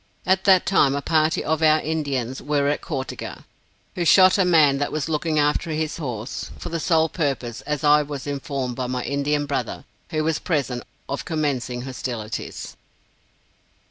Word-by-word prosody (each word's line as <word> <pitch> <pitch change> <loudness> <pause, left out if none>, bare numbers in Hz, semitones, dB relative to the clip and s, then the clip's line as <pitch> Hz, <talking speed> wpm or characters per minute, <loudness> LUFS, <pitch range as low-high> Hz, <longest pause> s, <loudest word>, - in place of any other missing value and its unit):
At 190 +1 +2
that 190 -2 +6
time, 140 -8 +3
a 140 - -1
party 160 0 +2
of 160 +1 0
our 155 0 +5
Indians 140 -6 -2
were 145 -1 +1
at 145 - -1
Cau 140 -7 -3
te - - -8
ga, - - -8 0.5
who 175 - -2
shot 185 +3 +6
a - - +5
man 155 -6 +5
that 145 - -1
was 155 0 -2
looking 155 0 -1
after 150 +3 +1
his 155 0 -2
horse, 125 -6 -5
for - - -6
the 165 0 -2
sole 160 -1 +3
purpose, 135 -8 -2
as 150 -1 -2
I 150 0 +6
was 145 -2 -6
informed 140 -3 -3
by 130 0 -3
my 125 0 -2
Indian 145 +1 0
brother, 135 -4 -3 0.2
who 155 -1 -1
was 160 0 0
present, 135 -7 -1 0.3
of 140 - -3
commencing 135 -6 -2
hostilities. 120 -4 -5
150 Hz, 175 wpm, -23 LUFS, 135-160 Hz, 0.5 s, that